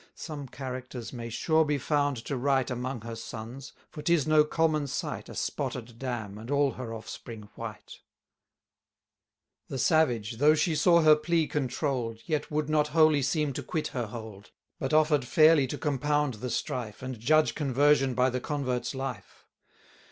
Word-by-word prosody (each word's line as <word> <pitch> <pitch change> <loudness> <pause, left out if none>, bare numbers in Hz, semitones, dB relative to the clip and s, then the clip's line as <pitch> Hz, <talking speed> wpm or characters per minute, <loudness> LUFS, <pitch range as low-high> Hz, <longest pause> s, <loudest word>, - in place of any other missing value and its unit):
Some 150 -4 -7
characters 130 -2 -7
may 115 -2 -6
sure 160 +7 +2
be 150 -1 0
found 145 -1 0
to 140 - -2
write 130 0 +1
Among 125 0 -3
her 115 +1 -6
sons; 115 +4 -8 0.2
for 150 - -9
'tis 160 -1 +2
no 155 -1 +5
common 155 -1 +1
sight, - - -4
A - - -9
spotted 115 -1 -4
dam, 110 -6 -4
and 115 +3 -9
all 140 -1 +2
her 125 -3 -7
offspring 110 -1 -8
white. 110 -2 -8 1.7
The 135 - -5
savage, 120 -7 +2
though 150 +4 +5
she 155 +1 +1
saw 170 +3 +5
her 155 -1 +8
plea 160 +1 +1
controll'd, 130 -4 -2
Yet 150 -3 -1
would 150 -1 -1
not 150 -1 +2
wholly 155 -1 +4
seem 145 +1 0
to - - -4
quit 160 -3 -3
her 120 -3 -3
hold, 105 -2 -9 0.3
But 135 - -2
offer'd 155 -2 +4
fairly 155 +1 +5
to 145 - -4
compound 145 -1 0
the 115 +4 -5
strife, 115 -2 -3
360 - - -6
And 130 -3 -5
judge 155 +4 +4
conversion 140 -2 +2
by 125 +1 +3
the 125 0 -2
convert's 135 -3 -2
life. 130 -6 -6
135 Hz, 165 wpm, -28 LUFS, 120-150 Hz, 1.7 s, her